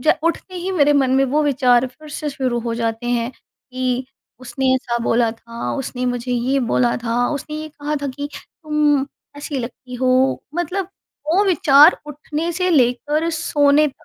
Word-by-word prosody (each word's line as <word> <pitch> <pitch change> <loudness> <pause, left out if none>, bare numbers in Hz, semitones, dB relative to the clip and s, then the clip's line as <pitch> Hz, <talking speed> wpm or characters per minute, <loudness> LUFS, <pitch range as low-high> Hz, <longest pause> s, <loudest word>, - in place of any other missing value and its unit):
ज 310 +5 +4
उठते 335 +3 -2
ही 360 +2 -3
मेरे 295 -5 +4
मन 275 -3 +2
में 270 - +4
वो 290 +4 +1
विचार 255 -3 +3
फिर 305 +5 -14
से 295 0 -4
शुरू 260 -3 -1
हो 230 0 -3
जाते 230 0 -2
हैं 240 0 0
कि, 255 0 -5 0.3
उसने 260 +1 0
ऐसा 240 -2 -1
बोला 230 0 +2
था, 230 +1 -6
उसने 255 -2 -4
मुझे 245 0 -2
ये 250 +3 +1
बोला 240 0 +1
था, 240 +1 +1
उसने 300 +1 -4
ये 310 0 -6
कहा 300 0 -4
था 285 - -1
कि 285 +2 -5
तुम, 300 -3 0 0.3
ऐसी 290 -1 -4
लगती 250 +1 -7
हो 255 +1 +2
मतलब 355 +2 -2 0.4
वो 395 +4 +4
विचार 320 -4 +6
उठने 300 +3 -4
से 365 +2 0
लेकर 295 +3 +2
सोने 300 -2 +3
तक। 270 - -19
270 Hz, 175 wpm, -20 LUFS, 245-300 Hz, 0.4 s, विचार